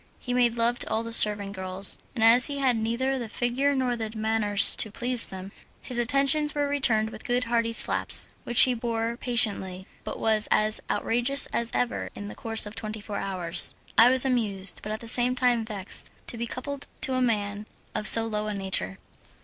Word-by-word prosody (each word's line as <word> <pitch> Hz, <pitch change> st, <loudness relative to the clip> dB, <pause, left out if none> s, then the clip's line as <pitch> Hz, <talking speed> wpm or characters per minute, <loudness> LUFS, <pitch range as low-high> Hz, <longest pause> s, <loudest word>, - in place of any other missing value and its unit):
He 245 Hz, -, -6 dB
made 240 Hz, -2 st, +1 dB
love 235 Hz, +1 st, 0 dB
to -, -, -3 dB
all 225 Hz, -, -1 dB
the 230 Hz, 0 st, -1 dB
servant 205 Hz, -3 st, +3 dB
girls, 190 Hz, 0 st, -1 dB, 0.2 s
and 225 Hz, -, -1 dB
as 235 Hz, +2 st, +6 dB
he 285 Hz, -, -5 dB
had 265 Hz, -3 st, +1 dB
neither 235 Hz, +4 st, -2 dB
the 235 Hz, -3 st, -6 dB
figure 255 Hz, +5 st, -1 dB
nor 255 Hz, -2 st, -1 dB
the 225 Hz, -2 st, -5 dB
manners 215 Hz, -2 st, +3 dB
to 220 Hz, -, +3 dB
please 240 Hz, +3 st, 0 dB
them, 190 Hz, +1 st, -9 dB, 0.3 s
his 245 Hz, -1 st, -2 dB
attentions 275 Hz, +5 st, +1 dB
were 290 Hz, -1 st, -1 dB
returned 230 Hz, -6 st, 0 dB
with -, -, -10 dB
good 245 Hz, +1 st, -1 dB
hearty 230 Hz, -1 st, -1 dB
slaps, 230 Hz, -, +2 dB, 0.2 s
which 240 Hz, -, +4 dB
he 255 Hz, -, +6 dB
bore 230 Hz, -1 st, -3 dB
patiently, 200 Hz, -7 st, -1 dB, 0.2 s
but -, -, -6 dB
was 220 Hz, -1 st, 0 dB
as 215 Hz, 0 st, 0 dB
outrageous 245 Hz, +4 st, 0 dB
as 235 Hz, 0 st, -1 dB
ever 245 Hz, 0 st, -2 dB
in 205 Hz, 0 st, -8 dB
the -, -, -10 dB
course 225 Hz, -1 st, 0 dB
of 210 Hz, -, -9 dB
twenty 220 Hz, -1 st, -6 dB
four 205 Hz, -1 st, -7 dB
hours. 185 Hz, -3 st, +2 dB, 0.2 s
I 230 Hz, +2 st, +7 dB
was 260 Hz, +1 st, +4 dB
amused, 205 Hz, -8 st, +2 dB
but 215 Hz, -, -7 dB
at 215 Hz, -, -5 dB
the 230 Hz, -, -8 dB
same 245 Hz, +2 st, +2 dB
time 245 Hz, -2 st, +1 dB
vexed 205 Hz, -3 st, -2 dB, 0.2 s
to -, -, -3 dB
be 235 Hz, +1 st, -4 dB
coupled 280 Hz, +3 st, -6 dB
to 265 Hz, -, +1 dB
a 255 Hz, -, 0 dB
man 210 Hz, -3 st, -2 dB, 0.3 s
of 210 Hz, -, -2 dB
so 225 Hz, 0 st, +5 dB
low 215 Hz, -1 st, -3 dB
a 210 Hz, -, -4 dB
nature. 185 Hz, -, -2 dB
230 Hz, 205 wpm, -25 LUFS, 210-245 Hz, 0.3 s, I